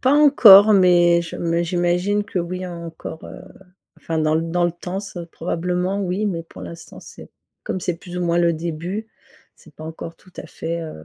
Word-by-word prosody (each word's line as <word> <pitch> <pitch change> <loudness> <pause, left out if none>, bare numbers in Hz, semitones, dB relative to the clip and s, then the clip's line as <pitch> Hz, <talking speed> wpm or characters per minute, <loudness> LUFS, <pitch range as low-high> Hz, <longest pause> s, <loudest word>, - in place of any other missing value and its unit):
Pas 260 +1 +2
encore 220 -9 +8
mais 175 -3 +4
je 165 - -8
m - - -7
mais 170 +1 +1
j'imagine 180 +4 0
que 195 -4 -3
oui, 180 +2 -5
encore, 165 -2 -8
heu - - -10 0.6
enfin 165 -1 -4
dans 155 0 +1
l 165 +1 -1
dans 175 +1 +1
le 175 - 0
temps 180 +2 -6
c'est 175 -4 -8
probablement, 180 +3 -2
oui, 190 +3 -2
mais 170 -5 -3
pour 95 - -13
l'instant 85 -1 -10
c'est - - -13 0.3
comme - - -4
c'est 180 -1 -2
plus 180 +1 -10
ou - - -2
moins 170 0 +1
le 170 -1 +3
début, 170 +6 -5 0.5
c'est - - -20
pas 155 - -11
encore 165 +1 -8
tout 185 - -22
à - - -8
fait, 170 +1 -5
heu 80 - -9
175 Hz, 205 wpm, -21 LUFS, 165-185 Hz, 0.6 s, encore